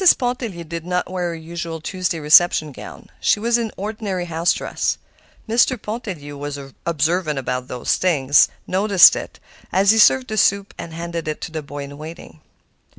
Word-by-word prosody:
Pontellier 245 -8 -3
did 165 0 -6
not 180 +1 -2
wear 180 -1 -2
her 170 - -4
usual 165 0 -6
Tuesday 180 +1 -3
reception 155 0 +5
gown; - - -11
she - - +2
was 235 +2 +1
in 225 -2 -3
ordinary 200 -3 -4
house 165 0 +1
dress. - - -2 0.5
Mr. 235 +2 +2
Pontellier, 205 - -6
who 145 - -9
was 145 0 -5 0.3
observant 160 0 0
about 125 -1 -3
such 125 -1 -7
things, 145 -6 +4 0.2
noticed 195 -1 +6
it, - - -7 0.3
as 195 +2 +4
he 225 - +2
served 255 +3 +5
the 215 - -3
soup 200 0 +2
and 170 - -8
handed 170 0 -5
it 155 - -3
to - - -6
the 160 -1 -4
boy 145 0 -7
in 140 +1 -10
waiting. 155 - -10
170 Hz, 175 wpm, -20 LUFS, 155-200 Hz, 0.5 s, noticed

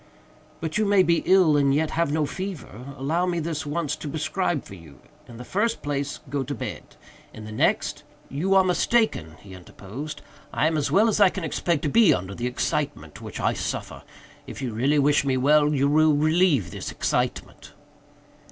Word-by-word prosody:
"But 160 +5 -2
you 215 - +2
may 200 -2 +5
be 170 -2 +2
ill 185 -5 +5
and 140 -1 +3
yet 155 +1 0
have 165 -3 0
no 155 0 +1
fever. 140 - -7
Allow 165 +7 0
me 175 -1 -1
this 160 -2 -4
once 150 0 -2
to 150 - -6
prescribe 160 +1 -2
for - - -11
you. 85 -6 -13 0.3
In 120 - -12
the 125 - -9
first 225 - -1
place, 145 -1 -3
go 140 +1 -2
to 130 - -4
bed. - - -7 0.4
In 110 - -9
the 110 - -8
next—" 110 - 0 0.3
"You 180 +8 0
are 190 - +6
mistaken," 180 - +1
he 100 -2 -13
interposed, 110 - -9 0.3
"I - - 0
am 160 0 +1
as 150 -2 0
well 215 +3 +4
as 215 - +1
I 195 - +7
can 185 -1 -6
expect 160 0 -1
to - - +1
be 225 +8 +5
under 95 +2 -5
the 120 +4 -3
excitement 140 - -3
which - - -7
I - - +1
suffer. - - -5 0.5
If - - -8
you 130 -4 -4
really 135 +7 +1
wish 145 +1 +3
me 135 -2 0
well, 150 +3 +4
you 140 -1 +2
will 155 +1 +4
relieve 155 - +2
this - - -6
excitement." - - -3
150 Hz, 195 wpm, -24 LUFS, 135-170 Hz, 0.5 s, I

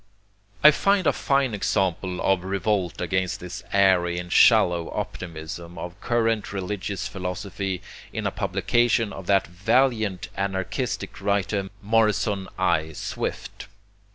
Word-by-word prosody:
I 150 - +10
find 195 +4 +2
a - - +4
fine 135 -3 +1
example 95 -2 -1
of 95 -2 +2
revolt 95 -1 -1
against 95 0 -1
the 90 -1 -7
airy 95 -3 +3
and 90 0 -5
shallow 85 -2 +5
optimism 85 0 -6
of 90 +4 -7
current 115 -4 0
religious 100 0 -3
philosophy 95 0 -4 0.3
in - - -4
a - - +1
publication 120 -2 +1
of 95 -2 -9
that 100 -1 +3
valiant 105 +1 +1
anarchistic 100 +5 -3
writer 100 0 0
Morrison 105 -2 +1
I. 80 0 +1
Swift. - - -5
95 Hz, 120 wpm, -25 LUFS, 90-105 Hz, 0.3 s, I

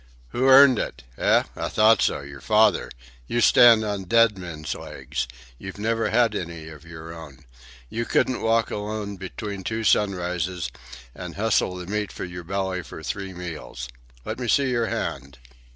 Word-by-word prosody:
"Who 130 - 0
earned 135 -2 +8
it? - - -4
Eh? - - +3
I - - -3
thought 110 +1 +4
so. - - +1
Your 70 -1 -10
father. 110 0 +3 0.4
You 120 - 0
stand 115 0 +7
on 100 -2 -3
dead 115 +2 +4
men's 85 -5 -6
legs. - - -5 0.3
You've 95 +1 -8
never 115 +2 0
had 115 -1 +3
any 85 -5 -5
of 75 0 -13
your 80 0 -9
own. 80 -5 -12 0.4
You 115 - -3
couldn't 130 +1 +1
walk 115 0 +2
alone 105 -1 -4
between 100 +1 -6
two 110 +3 -3
sunrises 90 - 0 0.4
and 90 -2 -8
hustle 105 -3 +1
the 90 -1 -7
meat 105 +2 -3
for - - -6
your 90 -1 -8
belly 95 +1 -2
for 80 -1 -10
three 95 +2 -4
meals. 80 -7 -7 0.4
Let - - -4
me 125 - -3
see 135 +2 +2
your 120 -2 +1
hand." 70 -9 -4
100 Hz, 170 wpm, -24 LUFS, 85-110 Hz, 0.4 s, earned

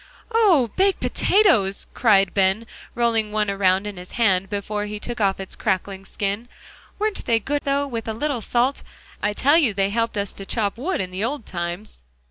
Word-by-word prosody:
"Oh! 365 - +4
baked 390 0 +2
potatoes," 245 - +2
cried 195 -5 +3
Ben, 195 +3 +2 0.3
rolling 230 -3 +1
one 210 -1 0
around 195 0 +2
in 205 -2 -6
his 180 0 -10
hand 195 -5 +2
before 205 +1 -3
he 210 0 -5
took 240 +1 -5
off 195 -1 +2
its 195 - -7
crackling 195 -1 -2
skin. 205 +5 -3 0.5
"Weren't 425 0 -2
they 230 - +3
good, 285 +6 -2
though, 280 0 +1
with 230 -5 -5
a 220 - -1
little 275 0 -2
salt. 245 +5 +1 0.4
I 205 - 0
tell 285 +9 +4
you, 240 -11 +1
they 195 0 +1
helped 230 0 -1
us 200 -1 -2
to 195 - -8
chop 205 -4 -1
wood 340 - -1
in 185 -1 -5
the 185 +3 -3
old 255 +1 -3
times!" 175 - -5
215 Hz, 190 wpm, -22 LUFS, 195-245 Hz, 0.5 s, Oh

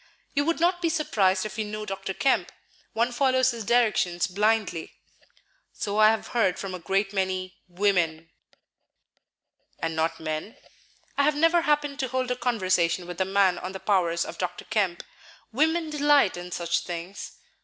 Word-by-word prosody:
"You 285 0 +1
would 335 +1 0
not 350 +1 +2
be 335 - +1
surprised 205 - +1
if 215 +1 -6
you 215 - 0
knew 215 0 -5
Dr. 195 -1 -5
Kemp; 270 - +1 0.4
one 235 +2 +1
follows 260 0 +2
his 230 -2 -6
directions 210 -6 +2
blindly." 205 -3 0 0.8
"So 205 +1 -2
I 215 0 +8
have 220 0 -1
heard 225 -7 +1
from 195 -1 -5
a 185 - -5
great 195 +3 -1
many 185 -1 -2
women." 175 -4 0 1.5
"And 165 0 -3
not 160 +1 -1
men?" 155 +7 -5 0.6
"I - - +5
have 300 +1 +2
never 330 +3 +4
happened 295 -2 0
to 260 - 0
hold 255 0 -2
a - - +1
conversation 185 -8 +1
with 180 +1 -5
a - - +2
man 190 -1 +2
on 185 +1 -6
the 190 - -6
powers 175 -5 +1
of - - -9
Dr. 180 - -4
Kemp. 190 -5 -1 0.5
Women 320 +4 +1
delight 290 -7 +3
in 175 0 -8
such 170 -1 0
things." 175 +3 -7
200 Hz, 165 wpm, -26 LUFS, 180-255 Hz, 1.5 s, I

